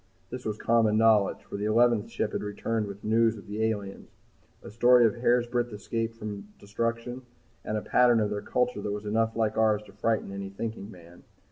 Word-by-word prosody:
This 125 0 -7
was 105 -1 -2
common 110 -2 +2
knowledge, 110 -3 +3
for - - -7
the 100 - -3
eleventh 115 0 +3
ship 110 -2 -2
had - - -3
returned 105 +1 -2
with 100 0 -9
the - - -5
news 115 0 +3
of 100 - -12
the 105 +2 -3
aliens, 100 -3 -3 0.5
a - - -9
story 120 +2 +5
of 110 - +3
hairbreadth 120 0 +1
escape 115 +2 -4
from 105 -3 -7
destruction, 115 +4 -3 0.4
and 110 - -2
a - - -2
pattern 120 -2 +4
of 105 -1 0
their 105 0 -3
culture 125 -2 -1
which 105 - -3
was 105 +1 -5
enough 110 +2 0
like 110 -1 0
ours 105 -1 +2
to 100 -2 -16
frighten 110 0 -1
any 100 0 -6
thinking 105 0 -6
man. 85 -3 -15
110 Hz, 205 wpm, -27 LUFS, 105-115 Hz, 0.5 s, story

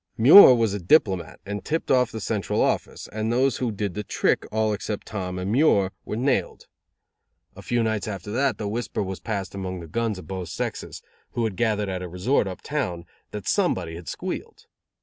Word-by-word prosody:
Muir 130 - +10
was 115 -4 +1
a 100 - -2
diplomat, 95 - +2
and 100 0 -5
tipped 160 +2 -2
off 125 -2 +3
the 110 - -5
Central 105 -2 -2
Office, - - -1
and 110 +1 -1
those 130 +3 +2
who 125 -3 -1
did 100 -2 -3
the 105 - -4
trick, - - 0
all 110 0 +1
except 105 0 -4
Tom 90 -3 -4
and 90 +2 -3
Muir, 105 -8 +3
were - - -4
nailed. 130 +4 -1 0.9
A - - -10
few 120 -1 0
nights 110 -2 -1
after 100 -1 -5
that 130 0 +1
the 105 - -4
whisper 110 0 -2
was 95 -1 -5
passed 100 -4 -4
among 95 -2 -5
guns 115 +2 -1
of 95 - -9
both 95 -3 -5
sexes, 85 - -5 0.3
who 120 - -1
had 110 -4 -1
gathered 105 -1 0
at 95 -1 -3
a 90 - -6
resort 95 +7 +1
up 95 - -7
town, 90 - -3 0.2
that 105 -1 -7
somebody 95 - 0
had 85 0 -9
squealed. - - -6
105 Hz, 195 wpm, -24 LUFS, 95-115 Hz, 0.9 s, Muir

